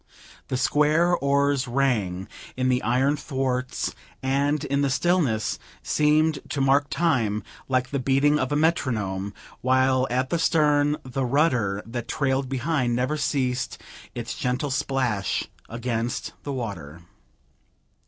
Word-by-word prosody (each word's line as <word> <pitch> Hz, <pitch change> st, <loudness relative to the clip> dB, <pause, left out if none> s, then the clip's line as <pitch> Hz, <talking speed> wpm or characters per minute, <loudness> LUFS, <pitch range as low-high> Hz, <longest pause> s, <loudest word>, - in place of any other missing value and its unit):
The 130 Hz, -, -1 dB
square 155 Hz, +6 st, +3 dB
oars 140 Hz, -2 st, +1 dB
rang 110 Hz, -8 st, 0 dB, 0.3 s
in 130 Hz, 0 st, +1 dB
the 125 Hz, 0 st, +2 dB
iron 130 Hz, +5 st, +2 dB
thwarts, 130 Hz, -3 st, -2 dB, 0.3 s
and, 140 Hz, +2 st, +1 dB
in 140 Hz, 0 st, 0 dB
the 140 Hz, -, +2 dB
stillness, 135 Hz, -6 st, +1 dB, 0.2 s
seemed 155 Hz, 0 st, +2 dB
to 140 Hz, -, -2 dB
mark 135 Hz, +1 st, +3 dB
time, 125 Hz, -10 st, +1 dB, 0.3 s
like 130 Hz, -1 st, +1 dB
the 140 Hz, -, 0 dB
beating 140 Hz, +3 st, +3 dB
of 130 Hz, -, -1 dB
a -, -, +2 dB
metronome, 110 Hz, -, 0 dB, 0.3 s
while 130 Hz, 0 st, +3 dB
at 130 Hz, +2 st, -1 dB
the 170 Hz, -, +1 dB
stern 150 Hz, -2 st, +3 dB
the 130 Hz, +1 st, -3 dB
rudder 125 Hz, -7 st, +1 dB
that 120 Hz, +1 st, -5 dB
trailed 135 Hz, -2 st, 0 dB
behind 135 Hz, -2 st, 0 dB
never 130 Hz, +5 st, 0 dB
ceased 135 Hz, -4 st, -1 dB, 0.4 s
its -, -, -4 dB
gentle 125 Hz, +3 st, -1 dB
splash 130 Hz, -7 st, 0 dB, 0.3 s
against 115 Hz, 0 st, -3 dB
the 145 Hz, -, -5 dB
water. 95 Hz, -, -5 dB
130 Hz, 130 wpm, -25 LUFS, 125-145 Hz, 0.4 s, square